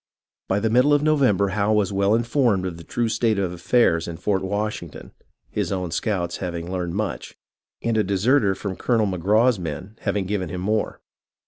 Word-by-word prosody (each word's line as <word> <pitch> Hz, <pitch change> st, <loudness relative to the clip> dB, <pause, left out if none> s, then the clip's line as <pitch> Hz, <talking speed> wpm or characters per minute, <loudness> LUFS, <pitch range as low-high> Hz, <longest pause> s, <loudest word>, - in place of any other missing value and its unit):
By 95 Hz, -, +1 dB
the 110 Hz, +1 st, 0 dB
middle 130 Hz, +5 st, +5 dB
of 145 Hz, -, +1 dB
November 130 Hz, -11 st, +3 dB
Howe 105 Hz, +2 st, +1 dB
was 105 Hz, -2 st, +1 dB
well 100 Hz, +2 st, +3 dB
informed 115 Hz, -4 st, +1 dB
of 90 Hz, -3 st, -4 dB
the 85 Hz, -, -10 dB
true 120 Hz, +8 st, -1 dB
state 110 Hz, -1 st, +1 dB
of 95 Hz, -3 st, -1 dB
affairs 85 Hz, -3 st, +2 dB
in 85 Hz, -1 st, -6 dB
Fort 95 Hz, 0 st, 0 dB
Washington, 100 Hz, -4 st, -4 dB, 0.4 s
his -, -, -2 dB
own 90 Hz, -3 st, -2 dB
scouts 85 Hz, -1 st, -1 dB
having 85 Hz, -1 st, -5 dB
learned 90 Hz, -2 st, -3 dB
much, 105 Hz, 0 st, -4 dB, 0.5 s
and 115 Hz, -1 st, 0 dB
a 110 Hz, -, +3 dB
deserter 100 Hz, +2 st, +2 dB
from 95 Hz, 0 st, -5 dB
Colonel 115 Hz, -3 st, +1 dB
Magraw's 105 Hz, +5 st, +2 dB
men 90 Hz, +5 st, -6 dB
having 100 Hz, -2 st, -1 dB
given 95 Hz, -3 st, -2 dB
him 90 Hz, +2 st, -5 dB
more. 105 Hz, +3 st, -1 dB
100 Hz, 185 wpm, -23 LUFS, 90-110 Hz, 0.5 s, middle